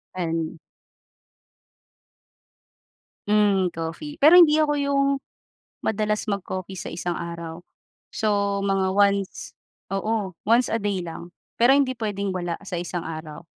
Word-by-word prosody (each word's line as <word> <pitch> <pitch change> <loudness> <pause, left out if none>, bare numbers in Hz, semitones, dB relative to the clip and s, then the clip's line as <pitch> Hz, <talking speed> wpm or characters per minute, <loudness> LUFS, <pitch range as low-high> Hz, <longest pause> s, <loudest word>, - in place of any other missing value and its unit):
And. 165 -2 -2 2.7
Hmm, 205 -3 +3
coffee 165 - -5
pero 310 +5 +7
hindi 305 -3 +6
ako 305 -1 +3
yung 280 0 +2 0.8
madalas 215 0 0
mag-coffee 195 -2 -4
sa - - -5
isang 175 +1 -3
araw. 170 -1 -6 0.5
So 200 -2 0
mga 195 -1 +1
once, 200 -1 +1 0.4
oo, 205 -1 -1 0.2
once 240 +2 +5
a 225 - 0
day 195 -3 -1
lang. 170 +1 -8 0.3
Pero 265 +4 +7
hindi 270 -2 +2
pwedeng 205 -5 -3
wala 175 -2 -3
sa 185 - -4
isang 175 -1 -4
araw, 155 0 -7
200 Hz, 120 wpm, -24 LUFS, 175-220 Hz, 2.7 s, pero